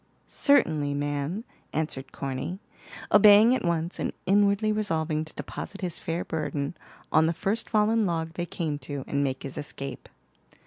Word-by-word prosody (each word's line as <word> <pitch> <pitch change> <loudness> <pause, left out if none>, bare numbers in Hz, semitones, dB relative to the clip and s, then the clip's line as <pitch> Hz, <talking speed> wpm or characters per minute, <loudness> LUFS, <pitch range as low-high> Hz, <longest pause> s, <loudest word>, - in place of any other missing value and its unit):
"Certainly 155 - +3
ma'am," 145 +7 -2 0.3
answered 150 -4 -3
Corny, 135 +6 -4 0.5
obeying 210 +3 +8
at 260 - 0
once, 170 0 -1
and - - -2
inwardly 200 +2 +3
resolving 160 -7 0
to 155 - -13
deposit 200 - -6
his 175 -3 -2
fair 165 +1 -3
burden 150 -1 -3 0.4
on 160 +1 +5
the 165 - +1
first 200 +7 -1
fallen 215 0 +3
log 165 -1 -2
they 175 0 -3
came 155 -5 -3
to, 140 0 -5
and 140 0 0
make 130 -1 -2
his 135 - -6
escape. 140 -2 -6
165 Hz, 150 wpm, -27 LUFS, 145-200 Hz, 0.5 s, obeying